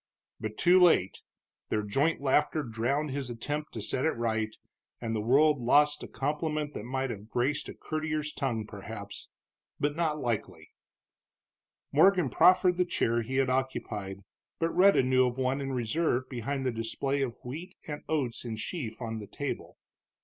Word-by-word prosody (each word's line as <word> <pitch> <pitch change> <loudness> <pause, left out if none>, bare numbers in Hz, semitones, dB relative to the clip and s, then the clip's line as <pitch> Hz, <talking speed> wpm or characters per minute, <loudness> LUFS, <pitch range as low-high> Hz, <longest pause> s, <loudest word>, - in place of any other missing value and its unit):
But 110 0 -5
too 180 +2 +6
late; 165 - +4 0.5
their 105 - 0
joint 140 +10 +1
laughter 150 +2 +2
drowned 130 +6 -1
his 135 -2 -3
attempt 145 +6 -3
to 110 - -4
set 130 +4 -1
it 160 - +1
right, 110 -2 -1 0.4
and 115 -1 -2
the 110 - -1
world 145 +6 +4
lost 145 +4 +4
a - - -6
compliment 150 +1 -2
that 105 - -6
might 130 +1 -2
have 105 0 -8
graced 130 +5 0
a - - -8
courtier's 155 -1 -3
tongue, 115 -6 -2
perhaps. 100 0 -8 0.5
But, 145 0 0
not 160 -2 0
likely. 120 -6 -3 1.2
Morgan 175 -2 +5
proffered 180 +2 +5
the 180 - +4
chair 120 -8 +1
he 125 +4 -4
had 135 -1 +2
occupied, 105 -7 -2 0.4
but 165 0 -1
Rhetta 190 -5 +6
knew 130 0 +4
of 125 +1 -4
one 130 +1 0
in 135 0 -3
reserve 130 +2 0
behind 135 +2 -3
the 130 - +2
display 120 +5 -1
of 125 -3 -2
wheat 160 +9 -7
and 150 -1 -5
oats 135 -7 -1
in 115 -2 -4
sheaf 115 -1 -5
on 115 -1 -4
the 105 - -8
table. 140 +7 -5
130 Hz, 165 wpm, -29 LUFS, 115-150 Hz, 1.2 s, too